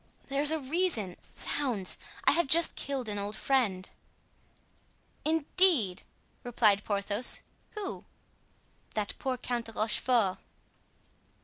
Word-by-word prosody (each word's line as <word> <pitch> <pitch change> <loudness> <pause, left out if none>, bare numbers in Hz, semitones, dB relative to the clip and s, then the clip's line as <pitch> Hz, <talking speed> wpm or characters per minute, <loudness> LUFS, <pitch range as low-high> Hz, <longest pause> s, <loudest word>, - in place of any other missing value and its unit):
"There's 280 +2 +5
a 320 - +3
reason! 275 - -1
Zounds! 240 -10 -2 0.2
I - - +5
have 335 0 +2
just 335 +4 +5
killed 270 -4 -3
an 205 -1 -3
old 205 +1 -4
friend." 215 -9 0 1.4
"Indeed!" 315 - +3 0.4
replied 215 -4 +2
Porthos, 205 +3 0 0.3
"who?" 410 -2 -5 0.9
"That 210 -1 -2
poor 260 -1 -2
Count 240 -1 -3
de 225 - -9
Rochefort." 215 -2 +1
245 Hz, 105 wpm, -29 LUFS, 205-290 Hz, 1.4 s, There's